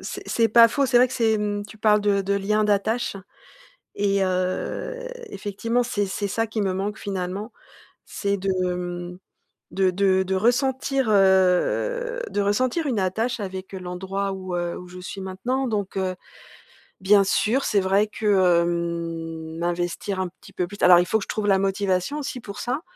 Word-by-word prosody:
c'est -, -, -6 dB
c'est 230 Hz, -1 st, +2 dB
pas 230 Hz, +1 st, +7 dB
faux. 280 Hz, +2 st, +1 dB
C'est 250 Hz, -, +2 dB
vrai 250 Hz, +1 st, +7 dB
que 260 Hz, -, -9 dB
c'est, 225 Hz, -3 st, +2 dB
mmh, 205 Hz, 0 st, -2 dB
tu 215 Hz, -, -14 dB
parles 210 Hz, 0 st, +4 dB
de 205 Hz, -1 st, +2 dB
de 200 Hz, +1 st, 0 dB
lien 210 Hz, +2 st, +1 dB
d'attache 210 Hz, +2 st, 0 dB, 0.8 s
et 200 Hz, -1 st, +1 dB
heu, 185 Hz, -, -2 dB, 0.4 s
effectivement, 230 Hz, -, -1 dB
c'est 205 Hz, -4 st, -1 dB
c'est 200 Hz, +2 st, -3 dB
ça 225 Hz, +3 st, 0 dB
qui 220 Hz, 0 st, -3 dB
me 195 Hz, -2 st, 0 dB
manque 205 Hz, +3 st, -3 dB
finalement. 195 Hz, +2 st, -4 dB, 0.5 s
C'est 200 Hz, -1 st, -2 dB
de, 195 Hz, +1 st, -2 dB, 0.2 s
hem, 175 Hz, 0 st, -5 dB, 0.5 s
de 190 Hz, -1 st, +2 dB
de 190 Hz, 0 st, +2 dB
de 190 Hz, 0 st, -2 dB
ressentir, 265 Hz, +4 st, +1 dB
heu, 200 Hz, -, +2 dB
de 205 Hz, -, -1 dB
ressentir 255 Hz, +10 st, +1 dB
une 240 Hz, -6 st, 0 dB
attache 220 Hz, +7 st, -1 dB
avec, 190 Hz, -1 st, -6 dB
heu, -, -, -4 dB
l'endroit 190 Hz, +2 st, -3 dB
où, 185 Hz, -2 st, -4 dB
heu, 175 Hz, 0 st, -3 dB
où 180 Hz, -, -10 dB
je 180 Hz, 0 st, -10 dB
suis 190 Hz, +2 st, -7 dB
maintenant 215 Hz, +8 st, -2 dB
donc, 205 Hz, -4 st, -3 dB
heu, 185 Hz, -1 st, -1 dB, 0.9 s
bien 195 Hz, +1 st, +5 dB
sûr. 230 Hz, +7 st, +1 dB
C'est 200 Hz, -, +2 dB
vrai 195 Hz, +3 st, +2 dB
que, 215 Hz, +1 st, -5 dB
hem, 170 Hz, -3 st, 0 dB
m'investir 175 Hz, +3 st, -2 dB
un 185 Hz, -, -1 dB
petit 180 Hz, -, -17 dB
peu 180 Hz, -, -2 dB
plus. 205 Hz, +3 st, -10 dB
Alors, 180 Hz, -1 st, +8 dB
il 175 Hz, -, +2 dB
faut -, -, +1 dB
que 195 Hz, -, -5 dB
je -, -, -23 dB
trouve 215 Hz, -1 st, -2 dB
la 195 Hz, -1 st, +4 dB
motivation 195 Hz, +6 st, 0 dB
aussi 275 Hz, -3 st, -5 dB
pour 205 Hz, -3 st, -9 dB
ça 255 Hz, +6 st, -2 dB
200 Hz, 185 wpm, -24 LUFS, 185-220 Hz, 0.9 s, Alors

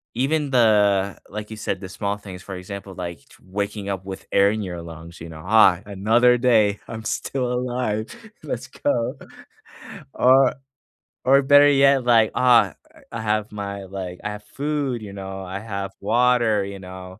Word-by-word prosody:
even 145 Hz, +3 st, 0 dB
the 105 Hz, -5 st, +3 dB
like 105 Hz, +1 st, -7 dB
you 110 Hz, -, -7 dB
said, 100 Hz, -3 st, -3 dB
the 95 Hz, -, -6 dB
small 100 Hz, 0 st, -3 dB
things, 95 Hz, -3 st, -10 dB
for 95 Hz, -, -7 dB
example, 95 Hz, +1 st, -8 dB
like, 85 Hz, -2 st, -6 dB, 0.2 s
waking 100 Hz, +1 st, -4 dB
up 95 Hz, -1 st, -4 dB
with 95 Hz, -1 st, -8 dB
air 100 Hz, 0 st, +5 dB
in 110 Hz, -, -3 dB
your 90 Hz, -2 st, -6 dB
lungs, 85 Hz, 0 st, -11 dB
you 85 Hz, -, -8 dB
know? 80 Hz, -1 st, -10 dB
"Ah, 95 Hz, -3 st, +5 dB
another 115 Hz, +5 st, +3 dB
day, 110 Hz, -5 st, +3 dB
I'm 110 Hz, -1 st, -7 dB
still 125 Hz, -2 st, -2 dB
alive, 125 Hz, -3 st, -2 dB, 0.4 s
let's -, -, -4 dB
go." -, -, -2 dB, 1.0 s
Or 130 Hz, 0 st, +5 dB, 0.7 s
or, 135 Hz, +2 st, +6 dB
better 145 Hz, +1 st, +7 dB
yet, 140 Hz, -1 st, +4 dB
like, 115 Hz, -3 st, +4 dB
uh, 125 Hz, -2 st, +5 dB, 0.4 s
I 115 Hz, -, -5 dB
have 110 Hz, -1 st, -1 dB
my 100 Hz, -1 st, -5 dB
like, 95 Hz, -2 st, -7 dB
I 105 Hz, -, -3 dB
have 105 Hz, -, -26 dB
food, 140 Hz, -4 st, -2 dB
you 105 Hz, -, -8 dB
know, 95 Hz, -1 st, -7 dB
I 95 Hz, +2 st, -5 dB
have 100 Hz, -2 st, -5 dB
water, 115 Hz, -1 st, +2 dB
you 100 Hz, 0 st, -7 dB
know. 95 Hz, 0 st, -10 dB
105 Hz, 170 wpm, -22 LUFS, 95-120 Hz, 1.0 s, better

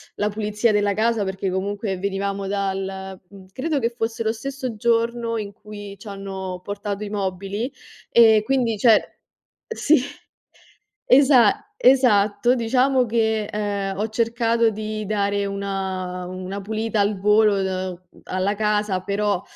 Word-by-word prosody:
la 210 Hz, 0 st, 0 dB
pulizia 210 Hz, +2 st, 0 dB
della 205 Hz, -1 st, +2 dB
casa 220 Hz, 0 st, +1 dB
perché 190 Hz, 0 st, -3 dB
comunque 195 Hz, +1 st, -2 dB
venivamo 195 Hz, +1 st, -2 dB
dal 190 Hz, -1 st, -3 dB
uhm, 195 Hz, -2 st, -14 dB
credo 290 Hz, +5 st, -1 dB
che 230 Hz, -, +1 dB
fosse 230 Hz, -1 st, -4 dB
lo 220 Hz, -1 st, +1 dB
stesso 255 Hz, +1 st, -5 dB
giorno 230 Hz, +1 st, 0 dB
in 205 Hz, -1 st, -6 dB
cui 205 Hz, -1 st, -10 dB
ci 210 Hz, -, -13 dB
hanno 190 Hz, -2 st, -6 dB
portato 205 Hz, +1 st, -4 dB
i 205 Hz, -, -5 dB
mobili 200 Hz, +4 st, -3 dB, 0.4 s
e 220 Hz, -2 st, +6 dB
quindi, 250 Hz, -5 st, +1 dB
cioè 220 Hz, 0 st, +5 dB, 0.7 s
sì, 315 Hz, -, +3 dB, 1.0 s
esa 260 Hz, -, +5 dB
esatto. 240 Hz, -, +4 dB
Diciamo 255 Hz, +2 st, +2 dB
che, 220 Hz, -1 st, +1 dB
ehm, 200 Hz, -2 st, -2 dB
ho 215 Hz, -, -1 dB
cercato 230 Hz, 0 st, +1 dB
di 215 Hz, 0 st, -4 dB
dare 200 Hz, -1 st, 0 dB
una 190 Hz, -2 st, -3 dB
una 185 Hz, +2 st, -6 dB
pulita 220 Hz, +1 st, -2 dB
al 200 Hz, -1 st, +1 dB
volo, 210 Hz, 0 st, +4 dB
uhm, 185 Hz, -2 st, -3 dB, 0.2 s
alla 185 Hz, +2 st, -1 dB
casa, 210 Hz, -2 st, 0 dB
però, 200 Hz, 0 st, -1 dB
210 Hz, 135 wpm, -22 LUFS, 195-230 Hz, 1.0 s, e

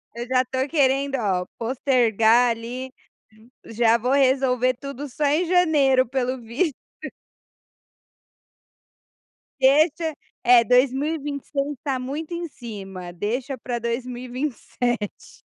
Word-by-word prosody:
Eu 240 Hz, +1 st, -5 dB
já 255 Hz, 0 st, +3 dB
estou 260 Hz, +2 st, -2 dB
querendo 275 Hz, -2 st, +2 dB
ó 190 Hz, -5 st, 0 dB
postergar 235 Hz, -2 st, +3 dB
ali, 245 Hz, +3 st, -6 dB, 0.7 s
já 230 Hz, 0 st, +2 dB
vou 250 Hz, +3 st, -1 dB
resolver 260 Hz, -2 st, +3 dB
tudo, 275 Hz, +2 st, -7 dB
só 295 Hz, +4 st, -2 dB
em 305 Hz, +5 st, +2 dB
janeiro 295 Hz, -8 st, +3 dB
pelo 255 Hz, 0 st, -2 dB
visto. 255 Hz, +7 st, -1 dB, 2.8 s
Deixa, 310 Hz, +3 st, +3 dB, 0.3 s
é 240 Hz, -1 st, +7 dB
2026 280 Hz, +3 st, 0 dB
está 265 Hz, -1 st, -3 dB
muito 300 Hz, +6 st, -5 dB
em 340 Hz, 0 st, -4 dB
cima, 195 Hz, -, -8 dB
deixa 245 Hz, +9 st, -3 dB
para 240 Hz, +1 st, -4 dB
2027. 245 Hz, -1 st, -4 dB
255 Hz, 100 wpm, -23 LUFS, 235-280 Hz, 2.8 s, é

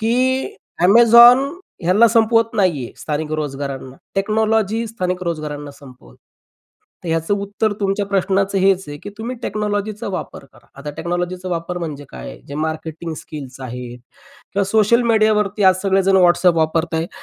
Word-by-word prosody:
की 260 Hz, -, 0 dB, 0.3 s
Amazon 235 Hz, +5 st, +8 dB, 0.4 s
ह्याला 185 Hz, +7 st, +5 dB
संपवत 225 Hz, 0 st, +2 dB
नाहीये, 170 Hz, -, 0 dB
स्थानिक 150 Hz, 0 st, -3 dB
रोजगारांना. 135 Hz, -3 st, -5 dB, 0.2 s
टेक्नॉलॉजी 220 Hz, +2 st, 0 dB
स्थानिक 185 Hz, -5 st, -3 dB
रोजगारांना 150 Hz, -3 st, -4 dB
संपवत. 135 Hz, -2 st, -16 dB, 0.9 s
तर -, -, -5 dB
ह्याचं 165 Hz, +4 st, 0 dB
उत्तर 205 Hz, +2 st, -1 dB
तुमच्या 200 Hz, 0 st, 0 dB
प्रश्नाचं 195 Hz, 0 st, 0 dB
हेच 190 Hz, 0 st, +2 dB
आहे 145 Hz, -, -6 dB
की 205 Hz, -, -7 dB
तुम्ही 240 Hz, +3 st, -5 dB
टेक्नॉलॉजीचा 210 Hz, +1 st, -3 dB
वापर 185 Hz, -6 st, -6 dB
करा. 120 Hz, -, -21 dB
आता 150 Hz, +1 st, -6 dB
टेक्नॉलॉजीचा 175 Hz, +2 st, -3 dB
वापर 175 Hz, 0 st, -3 dB
म्हणजे 150 Hz, -4 st, -6 dB
काय? -, -, -9 dB
जे 140 Hz, -, -7 dB
मार्केटिंग 160 Hz, +1 st, -4 dB
स्किल्स 135 Hz, -5 st, -9 dB
आहेत 125 Hz, -1 st, -7 dB, 0.5 s
किंवा 200 Hz, 0 st, +1 dB
सोशल 220 Hz, +4 st, +3 dB
मीडियावरती 215 Hz, -2 st, +2 dB
आज 185 Hz, -1 st, +6 dB
सगळे 195 Hz, -1 st, +2 dB
जण 195 Hz, 0 st, +4 dB
WhatsApp 175 Hz, 0 st, +4 dB
वापरतायत. 160 Hz, +1 st, 0 dB
185 Hz, 140 wpm, -19 LUFS, 155-215 Hz, 0.9 s, Amazon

